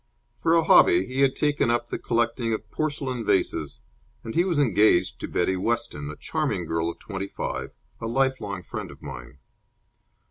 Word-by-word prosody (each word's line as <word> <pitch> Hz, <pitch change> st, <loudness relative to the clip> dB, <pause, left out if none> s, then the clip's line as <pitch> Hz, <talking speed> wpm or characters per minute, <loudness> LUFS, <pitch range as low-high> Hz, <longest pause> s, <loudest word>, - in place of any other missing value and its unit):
For 165 Hz, 0 st, +3 dB
a 165 Hz, -, +4 dB
hobby, 90 Hz, -, +6 dB
he 130 Hz, +2 st, -2 dB
had 135 Hz, -1 st, +4 dB
taken 145 Hz, -5 st, +1 dB
up 120 Hz, 0 st, 0 dB
the -, -, -3 dB
collecting 115 Hz, 0 st, 0 dB
of 110 Hz, -, -5 dB
porcelain 140 Hz, -5 st, -2 dB
vases, 95 Hz, -7 st, 0 dB, 0.4 s
and 115 Hz, -, -6 dB
he 170 Hz, -, +3 dB
was 180 Hz, -4 st, 0 dB
engaged 105 Hz, -8 st, +3 dB
to -, -, -4 dB
Betty 95 Hz, +2 st, 0 dB
Weston, 95 Hz, -8 st, -1 dB
a 75 Hz, -, -6 dB
charming -, -, -2 dB
girl 80 Hz, 0 st, -1 dB
of 85 Hz, -, -6 dB
twenty 95 Hz, -1 st, -5 dB
five, -, -, -4 dB, 0.3 s
a 115 Hz, -, -4 dB
lifelong 115 Hz, -7 st, -1 dB
friend -, -, -6 dB
of -, -, -14 dB
mine. 65 Hz, +2 st, -9 dB
115 Hz, 175 wpm, -25 LUFS, 90-135 Hz, 0.4 s, hobby